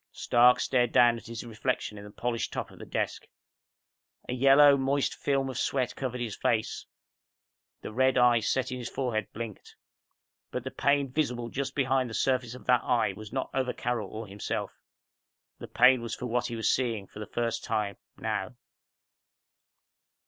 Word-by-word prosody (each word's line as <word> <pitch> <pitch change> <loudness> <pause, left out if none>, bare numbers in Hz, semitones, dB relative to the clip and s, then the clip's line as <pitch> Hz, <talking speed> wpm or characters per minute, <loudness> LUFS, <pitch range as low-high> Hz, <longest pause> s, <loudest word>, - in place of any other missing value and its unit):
Stark 125 +1 +4
stared 125 -2 +1
down 120 -1 +5
at 115 - -12
his 115 0 -6
reflection 115 -1 -2
in 100 - -9
the 105 - -10
polished 115 +3 -3
top - - -4
of - - -15
the - - -9
desk. - - -3 1.0
A - - -2
yellow, 140 +2 +7
moist 135 +1 0
film 135 -1 0
of 130 -2 -4
sweat 125 -2 0
covered 125 -2 -4
his 115 -4 -3
face. 110 -2 -1 0.9
The - - -7
red 130 +2 +3
eye 120 -1 +5
set 130 +4 -1
in 125 - -4
his 120 - -5
forehead 115 -6 -2
blinked. 110 -2 -8 0.7
But - - -4
the - - -5
pain 140 -2 +1
visible 125 -5 -1
just 135 +1 -4
behind 130 -2 +1
the 115 - -6
surface 125 -2 0
of 125 - -12
that 125 -2 +4
eye 115 -5 +1
was 105 +1 -10
not 130 - -3
over 130 -2 0
Carol 115 -5 -2
or 110 +1 -6
himself. 100 0 -5 0.8
The - - -8
pain 130 -1 +5
was 115 -2 -4
for - - -6
what 120 0 0
he 120 - -5
was 110 - -1
seeing 115 -6 0
for 105 - -12
the 105 - -6
first 115 -1 -2
time... 105 -3 -2 0.2
now. - - -3
120 Hz, 180 wpm, -29 LUFS, 115-130 Hz, 1.0 s, yellow